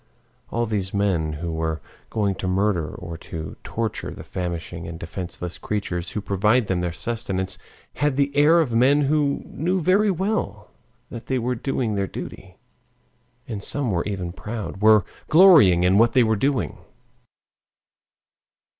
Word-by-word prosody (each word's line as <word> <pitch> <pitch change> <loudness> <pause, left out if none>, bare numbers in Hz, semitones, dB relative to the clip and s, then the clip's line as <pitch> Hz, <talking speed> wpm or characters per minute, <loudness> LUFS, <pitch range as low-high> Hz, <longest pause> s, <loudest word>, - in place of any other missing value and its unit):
All 120 +1 0
these 100 -3 -2
men 90 -6 +1
who 85 +3 -4
were 80 -1 -2 0.3
going 105 -3 0
to 95 - -4
murder 90 -3 +1
or 85 -1 -8
to 80 -2 -7
torture 115 -1 -3
the - - -9
famishing 85 -1 -5
and 85 0 -6
defenseless 90 0 -6
creatures 90 -5 -3
who 105 - -4
provide 105 +5 +2
them 95 -3 -1
their 90 -1 -1
sustenance 95 -2 -4 0.3
had 145 -2 0
the 140 0 0
air 150 +4 +6
of 140 -7 -1
men 130 +6 +4
who 145 0 +1
knew 180 +5 -1
very 195 +5 +3
well 180 - -2 0.4
that 115 -1 -8
they 130 - 0
were 125 +1 -1
doing 125 -2 -2
their 100 -1 -1
duty, - - -9 0.9
and 105 -4 -5
some 130 +2 -2
were 85 -2 0
even 95 -4 -3
proud, 105 +1 -6
were 110 -3 +6 0.2
"glorying" 155 - +7
in 95 +3 +4
what 115 0 +4
they 125 - +5
were 110 -1 +2
doing. 135 +5 -1
105 Hz, 155 wpm, -23 LUFS, 90-130 Hz, 0.9 s, glorying